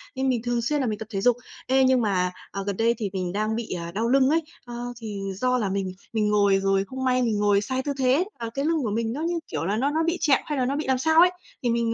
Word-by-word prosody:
Nên 265 0 0
mình 245 -3 +1
thường 240 -1 0
xuyên 290 +5 0
là 255 - 0
mình 210 -1 -2
tập 220 - -7
thể 195 -2 -2
dục. 245 +1 +4 0.3
Ê, 265 +1 +4
nhưng 260 -1 +4
mà, 185 -4 +1 0.2
à, 195 - -4
gần 200 -2 -2
đây 230 +1 +2
thì 210 -3 -2
mình 185 -2 -2
đang 215 +2 -1
bị, 230 -1 -4
à, 170 -1 -5
đau 220 +6 -1
lưng 265 +1 +4
ấy, 325 +2 +3 0.2
a, 240 - -9 0.3
thì 210 -3 -6 0.2
do 255 +4 +1
là 210 -5 -1
mình 190 -1 -2 0.2
mình 215 -2 +1
ngồi 200 -2 +3
rồi 195 0 +1
không 260 +4 -6
may 255 -1 +2
mình 225 -4 +1
ngồi 205 -1 +3
sai 260 +5 -2
tư 285 - -2
thế, 265 +6 +3
à, 230 -1 -4
cái 275 +3 -2
lưng 320 -4 +1
của 220 - -1
mình 225 +1 -1
nó 290 - -4
như, 340 +1 -1
kiểu 160 +1 -3
là, 205 +3 0
nó 270 +5 +1
nó 320 +2 +1
bị 335 +2 0
trẹo, 275 -4 +5
hay 295 - -3
là 255 - +1
nó 275 - -1
bị 300 - -2
làm 265 -1 +2
sao 320 +4 +3
ấy. 360 +1 +6 0.3
Thì 240 - +1
mình, 230 -1 +1
235 Hz, 300 wpm, -25 LUFS, 205-265 Hz, 0.3 s, ấy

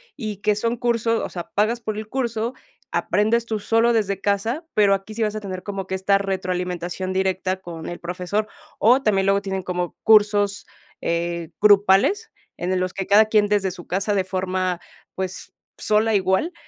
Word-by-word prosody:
y 215 -6 -5
que 210 0 +1
son 230 +3 -1
curso 230 -1 +1
o - - -6
sea, 175 -2 -7
pagas 225 +4 +1
por 215 -1 -4
el 215 - -5
curso, 235 -1 -2 0.4
aprendes 225 +3 +1
tú 220 -2 -2
solo 225 +3 +2
desde 200 -4 0
casa, 225 - -1
pero 205 -2 +4
aquí 195 +2 -3
sí 225 - 0
vas 210 0 -1
a 215 - -4
tener 185 -2 -6
como 195 -2 -4
que 190 - -3
esta 195 +1 +2
retroalimentación 185 -1 -3
directa 190 0 0
con 170 -3 -8
el 175 - -6
profesor, 180 +5 -2 0.3
o 250 +5 +5
también 195 -3 +2
luego 195 0 +3
tienen 190 -1 -3
como 180 -1 -3
cursos, 205 -2 +4 0.4
eh, 170 -1 -2
grupales, 205 - +4 0.2
en 180 +1 -3
el 185 - +1
los 185 0 -2
que 195 - -3
cada 210 +2 +6
quien 210 -1 +3
desde 205 -2 +1
su 175 -1 -10
casa 195 +3 -1
de 195 -2 +2
forma, 185 -1 -2 0.3
pues, 190 0 -5 0.3
sola 215 +1 +2
igual, 190 - +1
200 Hz, 185 wpm, -22 LUFS, 185-215 Hz, 0.4 s, cada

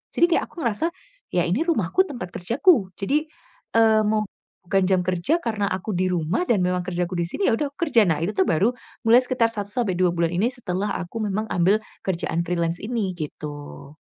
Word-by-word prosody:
Jadi - - +5
kayak - - 0
aku 335 - -8
ngerasa, 235 +7 0 0.5
"Ya 175 -1 +3
ini 185 - +1
rumahku 330 - +2
tempat 240 - -6
kerjaku" 235 - +3
jadi, 295 +10 0 0.5
eee, 220 -1 +5
mau 215 0 +2 0.4
bukan 195 +1 +2
jam 185 -1 +4
kerja 185 - +1
karena 220 -9 -2
aku 190 +4 -3
di 185 +1 +1
rumah 170 - 0
dan 215 -5 +3
memang 180 0 0
kerjaku 180 0 -2
di - - +2
sini 390 - -1
ya - - +2
udah 290 +5 -1
aku 335 +3 -3
kerja. 230 -6 +5
Nah, 160 -3 +1
itu 190 - 0
tuh 190 - +4
baru 180 +5 +3 0.4
mulai 235 +2 +8
sekitar 250 -2 +2
1-2 200 -4 0
bulan 170 -1 +1
ini 205 +8 +1
setelah 205 -5 -3
aku 185 +5 -5
memang 215 +3 -2
ambil 185 +4 +3 0.2
kerjaan 170 -2 -1
freelance 170 -1 -1
ini 210 -5 -2
gitu. 145 -2 -8
195 Hz, 190 wpm, -23 LUFS, 175-230 Hz, 0.5 s, mulai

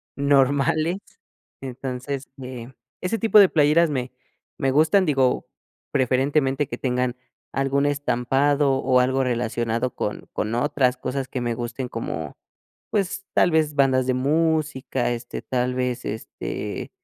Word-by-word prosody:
normales. 140 +4 +2 0.6
Entonces, 130 +1 -5 0.2
eh, 125 -1 -8 0.3
ese 185 +5 -1
tipo 220 -2 +5
de 195 - +7
playeras 155 +2 +4
me 130 -3 -3 0.5
me 135 - +1
gustan, 160 +8 +4
digo, 135 -5 +1 0.4
preferentemente 135 +1 +1
que 120 - -5
tengan 125 -1 -1 0.4
algún 135 +1 +1
estampado 140 0 +1
o 130 -1 +3
algo 130 +1 +2
relacionado 120 0 -1
con 105 - -4
con 105 +2 -2
otras 130 0 +1
cosas 130 +1 -3
que 130 - -4
me 120 -1 -1
gusten 120 +2 -4
como, 80 -11 -5 0.5
pues, 195 -1 -2
tal - - +4
vez 155 -2 +2
bandas 130 -2 +3
de 130 - +1
música, 145 -2 0
este, 120 0 -5
tal 125 0 -1
vez, 125 -1 -2
este, 110 - -5
135 Hz, 130 wpm, -23 LUFS, 125-145 Hz, 0.6 s, de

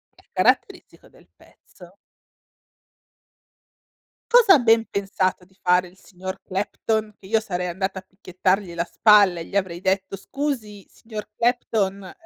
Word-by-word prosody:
Che - - -24
è - - -67
caratteristico - - -1
del - - -22
pezzo. 180 +1 -19 2.4
Cosa 475 -5 +7
ha - - +4
ben 225 -1 +3
pensato 190 -2 -2
di 190 +1 -28
fare, 180 0 +3
il 185 +2 -20
signor 190 +1 -8
Clapton? 215 +2 -2
Che 190 - -17
io 220 +1 +2
sarei 180 -4 -4
andata 190 +2 -3
a - - -13
picchiettargli 185 -1 -2
la 170 0 -1
spalla 205 -5 +5
e 165 - -6
gli - - -11
avrei 185 -3 -1
detto: 190 +1 -1
"Scusi, 225 -6 -5
signor 215 -2 -9
Clapton, 205 -5 -1
195 Hz, 140 wpm, -23 LUFS, 185-215 Hz, 2.4 s, Cosa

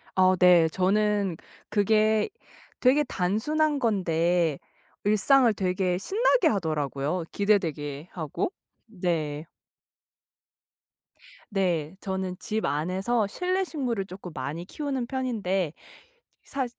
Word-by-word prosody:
아 185 0 +5
네. 180 -3 +6
저는 195 0 +1 0.3
그게 215 - +3 0.5
되게 270 +4 +4
단순한 285 +9 0
건데 175 - +1 0.5
일상을 230 +5 +4
되게 185 -1 0
신나게 430 - +2
하더라고요, 155 - -1
기대되게 165 -7 0
하고. 180 - -3 0.3
네. 165 -7 -2 2.1
네. 180 -5 0
저는 190 -2 -3
집 215 +1 -2
안에서 190 +9 0
실내 370 - -1
식물을 250 - -2
쪼끔 185 -1 -9
많이 145 +6 -5
키우는 270 +1 -3
편인데 205 - -1 0.7
사 270 -1 -3
190 Hz, 200 characters per minute, -27 LUFS, 170-235 Hz, 2.1 s, 네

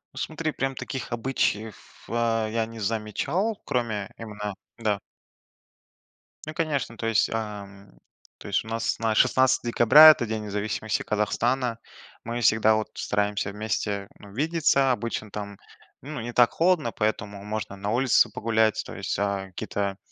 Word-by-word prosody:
Ну, - - -12
смотри, 160 0 -2
прям 135 -2 -2
таких 130 -1 -6
обычаев, 115 -3 -2
а, 115 -1 0
я 110 0 -1
не 115 - -10
замечал, 115 - -1
кроме 115 -6 -2
именно 105 -2 -5 0.2
да. 105 -3 0 1.5
Ну, 155 - -6
конечно, 150 -8 -2
то 115 - -4
есть, 115 -1 +2
ам, 100 -3 -6 0.5
то - - -11
есть - - 0
у - - -11
нас 115 0 -1
на 110 -1 0
16 130 0 +3
декабря- 145 +8 +9
это 135 -6 +4
День 110 -1 -3
независимости 105 +1 -2
Казахстана. 115 +3 0 0.5
Мы 120 +1 -3
всегда, 110 0 +4
вот, 110 0 -2
стараемся 105 -1 -1
вместе, 105 -1 -2
ну, 100 -1 -13
видеться, 140 -1 +2
обычно 115 -3 -3
там, 100 -1 -6 0.4
ну, 145 +1 -6
не 120 +1 -5
так 120 -1 +5
холодно, 165 -8 +2
поэтому 105 -2 -2
можно 105 -1 -4
на 100 +1 -3
улице 120 -1 +4
погулять, 110 0 +1
то - - -8
есть, - - -3
а, 100 -1 -1
какие-то 100 +1 -3
110 Hz, 150 wpm, -26 LUFS, 105-125 Hz, 1.5 s, декабря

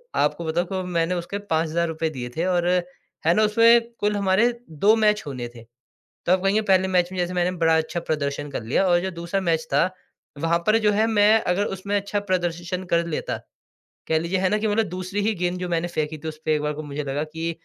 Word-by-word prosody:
आपको 170 - +1
बताऊँ 175 +4 -1
मैंने 170 0 0
उसके 175 +3 -4
5000 165 +1 +1
रुपए 160 0 -2
दिए 125 -5 -6
थे। 165 - +1
और 175 -2 +1 0.6
है 165 - +5
ना 215 - +4
उसमें 230 +2 +6 0.2
कुल 210 0 +1
हमारे 200 +3 +3 0.2
2 200 +8 +3
मैच 210 -1 +2
होने 125 -4 -4
थे। 115 - -11 0.6
तो 175 - +4
आप 185 0 +2
कहेंगे 200 +3 +2
पहले 190 -2 +3
मैच 180 -1 +1
में 185 - -5
जैसे 180 0 -1
मैंने 180 0 +1
बड़ा 165 -1 +4
अच्छा 160 +2 -2
प्रदर्शन 145 -2 -3
कर 135 - -4
लिया। 135 +12 +1
और 175 -1 +4
जो 190 +1 -3
दूसरा 170 +2 -3
मैच 165 -3 0
था, 140 - +4 0.5
वहाँ 165 +3 +1
पर 215 +1 +5
जो 210 -2 +2
है 215 +2 +2
मैं 220 0 +4
अगर 200 +3 +1
उसमें 200 +2 -2
अच्छा 205 0 -1
प्रदर्शन 180 -2 -2
कर 170 0 +3
लेता 165 - -3 0.7
कह 160 0 +2
लीजिए 170 +3 -1
है 185 0 +2
ना 210 - +2
कि 215 +1 -1
मतलब 215 +1 +2
दूसरी 185 +3 -3
ही 220 - +2
गेंद 180 +1 -1
जो 180 -1 -4
मैंने 170 0 0
फेंकी 155 -2 -2
थी 160 - -7
उसपे 155 0 -1
एक 150 - -1
बार 150 0 -1
को 155 +1 -6
मुझे 145 0 -5
लगा 140 +1 -2
कि 160 +2 -4
175 Hz, 230 wpm, -23 LUFS, 160-195 Hz, 0.7 s, उसमें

